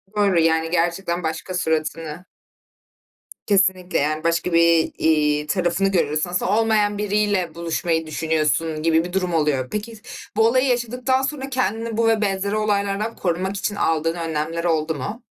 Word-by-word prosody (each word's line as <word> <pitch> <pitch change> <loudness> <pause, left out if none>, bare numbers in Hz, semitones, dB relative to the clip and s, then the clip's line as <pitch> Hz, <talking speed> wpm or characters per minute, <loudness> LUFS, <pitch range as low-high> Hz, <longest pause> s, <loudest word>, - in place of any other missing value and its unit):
Doğru, 200 -4 +3
yani, 160 0 +2
gerçekten 175 0 0
başka 160 +3 -4
suratını 160 0 -2 1.2
Kesinlikle 190 -2 +2
yani 155 +2 -1
başka, 170 +1 0
bir, 170 -1 +4
iii, 150 -1 +2
tarafını 185 +2 +1
görüyorsun. 155 -2 0
Aslında 180 +2 -1
olmayan 210 -2 +2
biriyle 205 -5 0
buluşmayı 165 -1 -1
düşünüyorsun 155 0 -1
gibi 165 0 +3
bir 180 +1 -7
durum 180 -2 -1
oluyor. 150 -5 +1
Peki 215 +1 -5 0.4
bu 220 0 +5
olayı 255 +3 +2
yaşadıktan 250 +2 0
sonra 270 -1 -3
kendini 230 -3 -2
bu 230 0 +2
ve 220 -1 +2
benzeri 200 +1 -1
olaylardan 210 +1 -1
korumak 190 +2 -2
için 205 +1 -2
aldığın 165 -2 0
önlemler 165 0 -3
oldu 160 -2 0
mu? 210 - -5
180 Hz, 145 wpm, -22 LUFS, 160-210 Hz, 1.2 s, bu